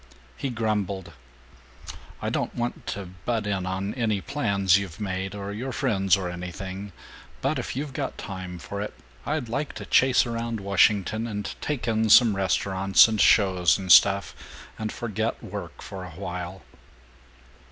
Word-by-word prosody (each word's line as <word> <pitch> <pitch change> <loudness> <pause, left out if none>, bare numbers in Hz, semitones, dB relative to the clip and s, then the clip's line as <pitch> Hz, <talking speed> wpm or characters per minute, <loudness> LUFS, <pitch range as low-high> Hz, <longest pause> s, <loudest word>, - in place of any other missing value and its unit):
He 135 - -3
grumbled, 105 -7 -2 1.1
"I - - -1
don't - - -2
want 120 0 -3
to 100 -1 -4 0.2
butt 115 -3 -1
in 95 -3 -1
on 95 +2 -2
any 110 -5 0
plans 100 -8 +2
you've 95 -5 -7
made 95 -1 -3
or 100 0 -5
your 125 +5 -4
friends 100 -8 +2
or 95 -2 -3
anything, 95 +3 -6 0.5
but - - 0
if - - -4
you've 140 +1 -4
got - - -4
time 95 -2 -6
for 100 +4 -6
it, 105 - -5 0.3
I'd 150 -4 -1
like 140 +6 -3
to - - -7
chase 130 -1 +4
around 115 -1 -3
Washington, 100 +3 +2
and 105 -2 -4
take 145 -5 -3
in 110 -1 +1
some 110 -1 +7
restaurants 95 +1 +4
and 110 -2 0
shows 95 -4 +4
and 95 -2 -2
stuff, 100 +4 +6 0.5
and 110 -1 -3
forget 110 0 -3
work - - -7
for 95 -2 -7
a 90 - -8
while." 90 +1 -6
100 Hz, 155 wpm, -26 LUFS, 95-115 Hz, 1.1 s, some